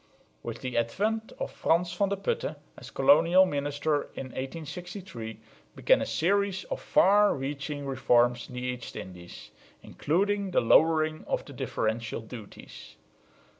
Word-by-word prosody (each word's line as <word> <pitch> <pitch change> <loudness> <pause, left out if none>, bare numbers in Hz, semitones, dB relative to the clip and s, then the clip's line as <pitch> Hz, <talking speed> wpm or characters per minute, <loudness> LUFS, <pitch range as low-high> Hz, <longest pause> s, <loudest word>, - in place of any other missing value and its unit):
With 115 0 -6
the 130 -2 -1
advent 215 - -1
of - - -4
Fransen 175 +2 +1
van 200 -1 +3
de 200 - -1
Putte, 460 - -2 0.2
as - - -11
colonial 185 -9 +5
minister 145 -1 -1
in 130 - -6
1863, 155 - -7 0.4
began - - +3
a - - -2
series 200 +2 +1
of - - -3
far 205 +2 +4
reaching 140 +1 -4
reforms 120 -3 +2
in 125 - -10
the 125 - -4
East 125 -1 -5
Indies, 90 -1 -10 0.3
including 200 +5 0
the 180 - +2
lowering 155 +5 +3
of - - -2
the - - -11
differential 110 +1 -2
duties. 110 -2 -11
150 Hz, 135 wpm, -28 LUFS, 125-190 Hz, 0.4 s, colonial